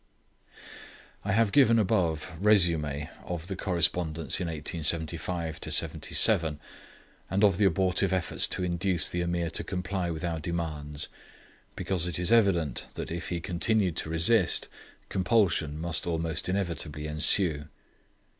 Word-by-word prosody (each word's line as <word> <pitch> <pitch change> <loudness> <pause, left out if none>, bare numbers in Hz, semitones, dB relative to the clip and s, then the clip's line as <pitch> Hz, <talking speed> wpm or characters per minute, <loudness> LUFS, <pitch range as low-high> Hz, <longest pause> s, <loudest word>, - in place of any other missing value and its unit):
I 100 - -1
have 110 -1 +2
given 125 -4 +5
the 110 - +3
above 85 -7 -1
resume 85 -8 +2 0.2
of 85 -2 -6
the 95 +1 -5
correspondence 85 -2 0
in 90 - -2
1875 80 +1 -3
77, 80 -3 +2 0.7
and 95 +3 0
of 100 -4 +4
the 105 - +4
abortive 95 +1 +1
efforts 95 -3 +2
to 95 - -3
induce 90 0 0
the 90 - -2
Ameer 85 -1 -2
to - - 0
comply 90 -1 -3
with 80 -2 -5
our 85 -2 -2
demands, 75 -3 -3 0.7
because 90 -3 -1
it 85 - -3
is 90 +4 +2
evident 95 - +2
that - - -6
if 85 -1 -5
he 90 - -2
continued 90 +1 0
to - - -3
resist 85 +4 +3 0.4
compulsion 90 -6 +1
must 85 +1 -3
almost 80 0 -2
inevitably 85 -6 -3
ensue. 75 0 +3
85 Hz, 135 wpm, -28 LUFS, 80-95 Hz, 0.7 s, given